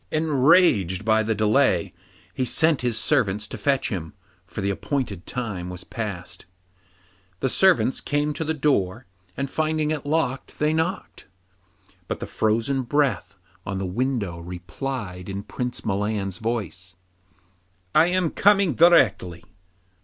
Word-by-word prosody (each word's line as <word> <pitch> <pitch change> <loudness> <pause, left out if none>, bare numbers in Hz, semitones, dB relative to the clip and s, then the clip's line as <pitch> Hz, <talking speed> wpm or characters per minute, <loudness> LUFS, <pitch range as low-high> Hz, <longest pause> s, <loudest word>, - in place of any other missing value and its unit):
Enraged 145 - +3
by 110 0 +4
the 110 0 -1
delay, 105 -3 +2 0.4
he 130 - -1
sent 155 +3 +2
his 120 -2 0
servants 105 -7 +1
to - - -7
fetch 140 -2 0
him, 90 -4 -5 0.3
for - - -8
the 100 0 0
appointed 105 - -3
time 100 -8 -4
was 90 0 -7
past. 100 -6 -6 0.9
The - - 0
servants 180 -5 +3
came 145 +1 0
to 160 - -3
the 160 0 -1
door, 135 -11 0 0.3
and 140 - -1
finding 155 +1 -1
it 155 -2 -2
locked, 145 -3 -2
they 150 +1 +1
knocked; 165 +4 -3 0.8
but - - -3
the - - -4
frozen 115 +5 0
breath 120 -8 0 0.3
on 95 +1 -4
the 95 - -2
window 100 -3 -2
replied 90 +2 -6
in 100 +1 -4
Prince 125 +3 -5
Milan's 100 -1 -2
voice, 100 -6 -4 1.0
'I 155 - +6
am 180 -2 +1
coming 200 -5 +4
directly. 110 - +4
120 Hz, 135 wpm, -24 LUFS, 95-150 Hz, 1.0 s, I